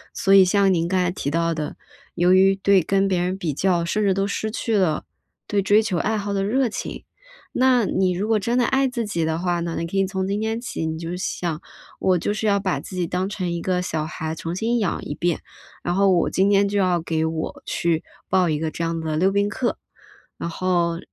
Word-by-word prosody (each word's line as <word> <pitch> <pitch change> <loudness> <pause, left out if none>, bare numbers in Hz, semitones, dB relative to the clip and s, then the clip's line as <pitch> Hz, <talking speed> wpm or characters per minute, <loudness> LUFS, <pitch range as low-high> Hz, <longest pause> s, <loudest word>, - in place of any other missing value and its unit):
所 195 - +2
以 195 -1 +9
像 195 0 +3
您 165 -1 0
刚 185 +1 +1
才 180 -1 +1
提 140 - -3
到 165 +1 +1
的， 155 -2 -5 0.4
由 180 +1 +4
于 195 +1 +5
对 195 -1 +3
跟 195 +3 +1
别 185 -2 +1
人 185 +2 -1
比 165 -6 -2
较， 175 +1 +1
甚 210 +5 0
至 195 -2 +2
都 195 0 +1
失 215 +2 -2
去 225 0 -2
了 180 -6 +1 0.4
对 205 -1 0
追 205 +3 +4
求 195 -6 -1
爱 220 0 0
好 205 0 -3
的 195 -1 0
热 250 +5 +2
情。 215 - -6 0.5
那 250 -3 +3
你 190 -1 +1
如 195 +4 -2
果 220 -1 +2
真 235 +4 0
的 245 - +3
爱 270 +1 +2
自 240 -3 -3
己 170 -6 -1
的 160 0 0
话 175 0 0
呢， 170 -1 -3
你 165 - -2
可 170 - -7
以 195 0 +2
从 190 0 -2
今 200 +2 -1
天 220 +1 -1
起， 200 -9 -4
你 160 0 -3
就 170 +1 -5
想， 175 -3 -3 0.4
我 185 -1 +3
就 205 - -1
是 215 +1 -2
要 200 -1 +3
把 185 -8 -1
自 180 +5 -9
己 180 -1 0
当 185 +3 -2
成 185 -4 -3
一 170 0 -3
个 180 -1 0
小 155 -3 -2
孩， 160 0 -4
重 165 +2 -5
新 230 +4 0
养 195 -6 -1
一 - - -4
遍。 170 +2 -1 0.4
然 175 - -1
后 195 +1 +3
我 175 - +2
今 195 +2 +2
天 200 0 +4
就 200 0 0
要 180 -2 +2
给 160 -1 -1
我 160 0 -4
去 165 -2 0 0.2
报 185 -2 +2
一 150 - +1
个 160 +1 -2
这 170 - -4
样 165 0 -1
的 160 -1 -2
溜 190 +3 +3
冰 200 +1 +2
课， 240 +3 -2 0.6
然 170 - -4
后 170 -1 0
185 Hz, 260 characters per minute, -23 LUFS, 170-200 Hz, 0.6 s, 以